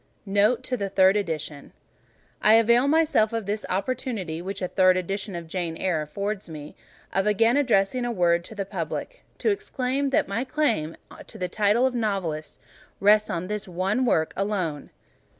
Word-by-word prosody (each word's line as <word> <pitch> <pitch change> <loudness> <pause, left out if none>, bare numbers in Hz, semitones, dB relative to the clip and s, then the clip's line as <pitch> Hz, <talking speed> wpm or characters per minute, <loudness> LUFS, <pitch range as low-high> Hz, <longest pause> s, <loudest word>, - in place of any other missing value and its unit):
NOTE 210 +5 +2
TO 255 0 -2
THE 200 -2 -3
THIRD 190 0 +4
EDITION 160 -7 -4 0.7
I 215 - +6
avail 235 +3 +4
myself 295 -8 +3
of 225 -2 -2
the 210 +2 -2
opportunity 195 -5 -3
which 195 +1 -5
a - - 0
third 185 0 +4
edition 195 +2 -3
of 170 -1 -6
"Jane 165 -1 -3
Eyre" 175 -5 0
affords 200 +6 -4
me, 150 -2 -9 0.4
of 195 +2 +1
again 225 +4 +3
addressing 245 -4 +2
a 240 - -1
word 170 -4 +2
to 220 - -10
the 200 -1 -3
Public, 190 - -5
to 440 - +1
explain 275 -7 -1
that 270 - +1
my 210 +5 -1
claim 250 - -1 0.3
to - - -8
the 180 - -2
title 210 +6 +2
of 260 - +1
novelist 195 -10 -2 0.4
rests 210 +1 +4
on 170 +1 -2
this 210 +1 -3
one 190 +7 0
work 160 -10 +1
alone. 185 -7 -2
200 Hz, 170 wpm, -25 LUFS, 180-230 Hz, 0.7 s, I